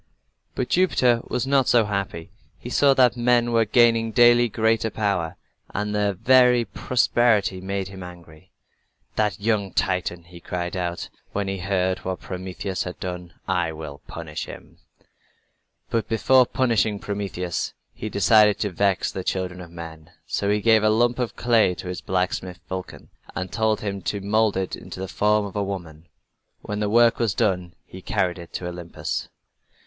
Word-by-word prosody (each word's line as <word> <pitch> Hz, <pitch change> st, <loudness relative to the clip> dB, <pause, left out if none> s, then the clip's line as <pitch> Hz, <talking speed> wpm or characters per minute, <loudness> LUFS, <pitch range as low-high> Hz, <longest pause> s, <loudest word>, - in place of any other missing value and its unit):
But 125 Hz, -, -2 dB
Jupiter 125 Hz, -10 st, +3 dB
was 125 Hz, +1 st, -1 dB
not 135 Hz, -1 st, +3 dB
so 115 Hz, -3 st, +4 dB
happy. 100 Hz, -5 st, -4 dB, 0.3 s
He -, -, -9 dB
saw 140 Hz, -1 st, +4 dB
that 125 Hz, -2 st, +4 dB
men 120 Hz, 0 st, +2 dB
were 115 Hz, -1 st, +3 dB
gaining 115 Hz, 0 st, +4 dB
daily 120 Hz, 0 st, +5 dB
greater 110 Hz, +1 st, +1 dB
power, 100 Hz, -6 st, -1 dB, 0.4 s
and 105 Hz, +1 st, -1 dB
their 105 Hz, -1 st, +1 dB
very 125 Hz, +3 st, +4 dB
prosperity 115 Hz, -7 st, +1 dB
made 95 Hz, 0 st, -3 dB
him 95 Hz, -1 st, -10 dB
angry. 90 Hz, -1 st, -12 dB, 0.6 s
"That 105 Hz, -5 st, 0 dB
young 105 Hz, -2 st, 0 dB
Titan!" 90 Hz, -3 st, -1 dB
he 85 Hz, 0 st, -13 dB
cried 90 Hz, +1 st, -4 dB
out, 90 Hz, -1 st, -3 dB, 0.2 s
when 100 Hz, -1 st, -1 dB
he 95 Hz, 0 st, -3 dB
heard 95 Hz, 0 st, 0 dB
what 95 Hz, 0 st, -4 dB
Prometheus 95 Hz, +1 st, -5 dB
had 90 Hz, -, -5 dB
done. 90 Hz, -2 st, -6 dB
"I 80 Hz, -, 0 dB
will 75 Hz, -2 st, -8 dB
punish 80 Hz, -2 st, -6 dB
him." -, -, -12 dB, 1.1 s
But 115 Hz, -1 st, 0 dB
before 125 Hz, +3 st, +4 dB
punishing 115 Hz, -5 st, +1 dB
Prometheus 100 Hz, -4 st, -3 dB, 0.2 s
he 110 Hz, -, -5 dB
decided 105 Hz, +1 st, +5 dB
to 105 Hz, -, 0 dB
vex 100 Hz, +1 st, +1 dB
the 95 Hz, -, -5 dB
children 90 Hz, -1 st, -3 dB
of 85 Hz, -, -10 dB
men. 80 Hz, -2 st, -10 dB, 0.2 s
So 100 Hz, -, -1 dB
he 105 Hz, 0 st, +2 dB
gave 110 Hz, 0 st, +5 dB
a 110 Hz, -, +3 dB
lump 120 Hz, +3 st, +2 dB
of 125 Hz, -2 st, -2 dB
clay 115 Hz, -6 st, +3 dB
to 90 Hz, -, -7 dB
his 90 Hz, -, -5 dB
blacksmith, 90 Hz, -1 st, -2 dB
Vulcan, 95 Hz, -1 st, -7 dB, 0.3 s
and 95 Hz, 0 st, -4 dB
told 110 Hz, -1 st, +1 dB
him 100 Hz, -2 st, -3 dB
to 100 Hz, -, -2 dB
mold 105 Hz, +1 st, +1 dB
it 95 Hz, -1 st, -2 dB
in -, -, -12 dB
the 95 Hz, +1 st, -5 dB
form 105 Hz, +2 st, +2 dB
of 100 Hz, -, -8 dB
a 105 Hz, -, 0 dB
woman. 85 Hz, -5 st, -6 dB, 0.6 s
When 105 Hz, 0 st, -4 dB
the 105 Hz, -1 st, 0 dB
work 120 Hz, +2 st, +4 dB
was 115 Hz, -5 st, +1 dB
done 90 Hz, -3 st, 0 dB
he 95 Hz, -, -11 dB
carried 90 Hz, -1 st, -1 dB
it 85 Hz, -1 st, -11 dB
to 90 Hz, -, -4 dB
Olympus. 85 Hz, -1 st, -5 dB
100 Hz, 170 wpm, -24 LUFS, 90-115 Hz, 1.1 s, daily